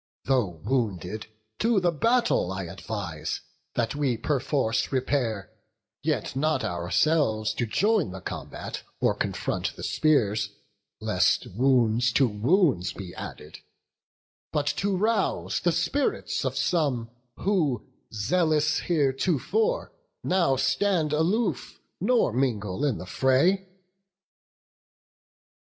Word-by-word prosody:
Though 110 -11 +1
wounded, 110 -5 -1 0.3
to 225 -2 +3
the 180 -2 +2
battle 230 - +2
I 95 0 -3
advise 90 -2 -5 0.3
That 115 -2 0
we 140 -5 0
perforce 130 -2 0
repair; 125 -6 -1 0.5
yet 145 -6 -1
not 155 +3 +1
ourselves 110 - +1
To 120 - -2
join 205 - +2
the 95 +1 -7
combat, 90 - -6 0.2
or - - +3
confront - - -2
the - - -9
spears, 105 -9 +1 0.5
Lest - - +2
wounds 120 -2 +3
to 135 - +4
wounds 115 - +2
be 95 -3 -8
added; - - -8 0.9
but 145 -1 0 0.2
to 195 -1 +1
rouse 220 +3 0
The 175 - +2
spirits 175 - 0
of - - -2
some, 135 -10 0 0.3
who, 170 - 0 0.3
zealous 155 - +2
heretofore, 175 - 0 0.3
How 170 -8 +3
stand 150 +4 +1
aloof, 180 +10 0 0.2
nor 240 - +2
mingle 115 -4 -1
in 135 -7 +1
the - - -7
fray." 155 - +2
135 Hz, 105 wpm, -26 LUFS, 110-170 Hz, 0.9 s, to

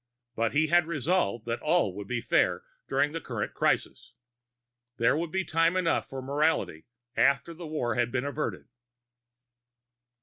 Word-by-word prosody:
But 115 0 0
he 150 +2 +3
had 170 +1 +3
resolved 155 - 0
that 115 0 -3
all 155 - +2
would 100 -1 -7
be 120 0 -2
fair - - +2 0.3
during 145 - +2
the 165 +1 -4
current 115 -5 -4
crisis. 125 - -1 0.8
There 115 +4 +3
would 165 +1 -2
be 190 +2 0
time 165 +3 +2
enough 170 -3 +1
for 135 -1 -6
morality 140 - 0 0.3
after 140 +5 +2
war 155 -7 -3
had 120 -1 0
been 130 +1 -1
averted. 145 +1 -3
145 Hz, 145 wpm, -28 LUFS, 120-165 Hz, 0.8 s, he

